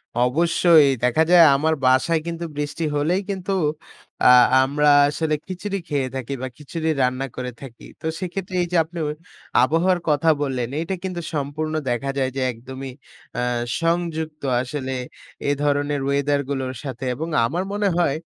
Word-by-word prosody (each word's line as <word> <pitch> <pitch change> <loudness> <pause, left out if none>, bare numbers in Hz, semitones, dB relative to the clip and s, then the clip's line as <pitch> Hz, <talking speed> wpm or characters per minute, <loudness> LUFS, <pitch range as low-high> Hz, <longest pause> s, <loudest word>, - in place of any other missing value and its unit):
অবশ্যই, 160 +4 +4 0.2
দেখা 125 +6 +3
যায় 175 -2 +8
আমার 155 +3 +1
বাসায় 130 +6 +3
কিন্তু 170 0 -4
বৃষ্টি 150 +2 -3
হলেই 165 +6 +1
কিন্তু 195 0 -2 0.7
আ - - +6 0.4
আমরা 145 +2 +2 0.2
আসলে 155 +1 -1
খিচুড়ি 195 +2 -4
খেয়ে 140 -4 -1
থাকি, 130 +1 -4
বা 130 - -2
খিচুড়ি 160 +2 -4
রান্না 130 +1 0
করে 125 0 -4
থাকি। 125 -4 -11 0.2
তো - - -9
সেক্ষেত্রে 185 0 -5
এই - - -3
যে 180 - +2
আপনিও 165 0 -5 0.6
আবহাওয়ার 170 +6 +2
কথা 150 +2 +3
বললেন 130 -4 -2
এইটা 165 +4 -2
কিন্তু 180 -2 -4
সম্পূর্ণ 150 +2 -3 0.2
দেখা 120 +3 -1
যায় 130 -1 +1
যে 135 - -2
একদমই 130 +3 -8 0.5
আ - - 0 0.4
সংযুক্ত। 165 -2 -1 0.2
আসলে 130 0 -4 0.6
এ - - +3
ধরনের 145 0 +1
ওয়েদার 140 +1 +1
গুলোর 130 -2 -2
সাথে, 135 -2 -5
এবং 160 +6 -4 0.2
আমার 175 +10 -1
মনে 205 0 +1
হয় 155 -4 +2
150 Hz, 155 wpm, -22 LUFS, 135-170 Hz, 0.7 s, যায়